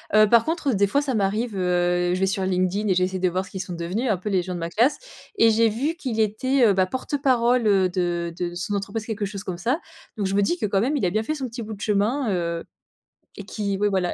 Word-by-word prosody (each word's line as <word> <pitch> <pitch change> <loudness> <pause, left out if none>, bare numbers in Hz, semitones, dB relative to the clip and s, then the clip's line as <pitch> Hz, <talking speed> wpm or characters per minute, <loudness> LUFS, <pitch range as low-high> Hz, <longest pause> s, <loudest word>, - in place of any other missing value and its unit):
Heu, 215 -1 +6
par 230 0 +5
contre, 315 -5 0
des 200 -1 +3
fois, 280 +8 +1
ça 275 -4 -2
m'arrive, 215 +3 0
heu, 175 -1 +1
je - - -3
vais 190 - +3
sur 190 0 -1
LinkedIn 185 +3 0
et 190 - +3
j'essaie 185 +1 0
de 185 - +2
voir 185 +2 -1
ce - - -15
qu'ils 190 - -6
sont 180 -1 -6
devenus, 185 +9 -2
un 210 - +3
peu, 185 +4 -5
les 190 -3 +2
gens 180 +1 -5
de 175 - -4
ma 165 0 -3
classe. 235 - +2 0.4
Et 230 - +6
j'ai 225 +1 +4
vu 265 +10 -1
qu'il 245 -9 -2
était, 250 +5 +2
heu, 210 - +5
bah, 190 -1 +3
porte-parole, 250 0 +1
heu, 190 -3 +3
de 175 -2 -2
de 175 -1 -3
son 185 +4 -3
entreprise, 200 +2 -3
quelque 215 -3 -3
chose 200 0 -6
comme 180 -2 -5
ça. 245 - -1 0.3
Donc 205 -3 -1
je 195 - -1
me 205 - +3
dis 275 - +1
que, - - -2
quand 195 -1 +1
même, 260 +9 +1
il 265 - 0
a - - +2
bien 215 +5 0
fait 310 +7 -2
son 270 -4 -4
petit 235 +1 -7
bout 220 -1 -6
de 205 - -11
chemin, 220 +6 +1
heu, 170 -2 -2 0.7
et 200 - -8
qu'il 200 -2 -3
ouais, 205 0 +2
voilà. 190 -3 0
205 Hz, 275 wpm, -24 LUFS, 185-230 Hz, 0.7 s, Heu